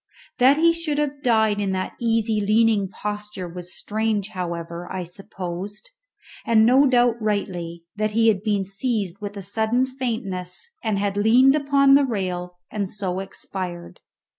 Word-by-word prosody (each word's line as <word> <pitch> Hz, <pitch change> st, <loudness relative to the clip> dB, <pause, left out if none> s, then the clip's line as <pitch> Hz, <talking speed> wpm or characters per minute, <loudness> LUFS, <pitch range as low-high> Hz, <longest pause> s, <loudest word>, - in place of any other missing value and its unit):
That 265 Hz, +3 st, +6 dB
he 335 Hz, +1 st, +5 dB
should 330 Hz, -3 st, -3 dB
have 290 Hz, -1 st, -1 dB
died 220 Hz, -5 st, +2 dB
in 195 Hz, -2 st, -1 dB
that 185 Hz, 0 st, -3 dB
easy 225 Hz, -2 st, +1 dB
leaning 215 Hz, -1 st, +3 dB
posture 210 Hz, -2 st, -5 dB
was 180 Hz, +1 st, -7 dB
strange; 215 Hz, -1 st, -1 dB
however, 170 Hz, -2 st, -5 dB
I 185 Hz, -1 st, -3 dB
supposed, 190 Hz, -, -7 dB, 0.5 s
and 220 Hz, -1 st, +4 dB
no 265 Hz, +4 st, +5 dB
doubt 240 Hz, -2 st, +3 dB
rightly, 180 Hz, -5 st, -2 dB
that 215 Hz, 0 st, +1 dB
he 225 Hz, 0 st, +5 dB
had 200 Hz, -3 st, +1 dB
been 205 Hz, -2 st, 0 dB
seized 200 Hz, -2 st, -2 dB
with 205 Hz, 0 st, -6 dB
a 200 Hz, -, -6 dB
sudden 220 Hz, +6 st, +1 dB
faintness, 235 Hz, -, -3 dB
and 215 Hz, -3 st, 0 dB
had 200 Hz, 0 st, -1 dB
leaned 245 Hz, +6 st, +5 dB
upon 280 Hz, -2 st, +4 dB
the 280 Hz, +1 st, +6 dB
rail 180 Hz, -6 st, -3 dB
and 200 Hz, -3 st, -2 dB
so 190 Hz, -3 st, -3 dB
expired. 185 Hz, -2 st, -6 dB
210 Hz, 155 wpm, -23 LUFS, 185-235 Hz, 0.5 s, That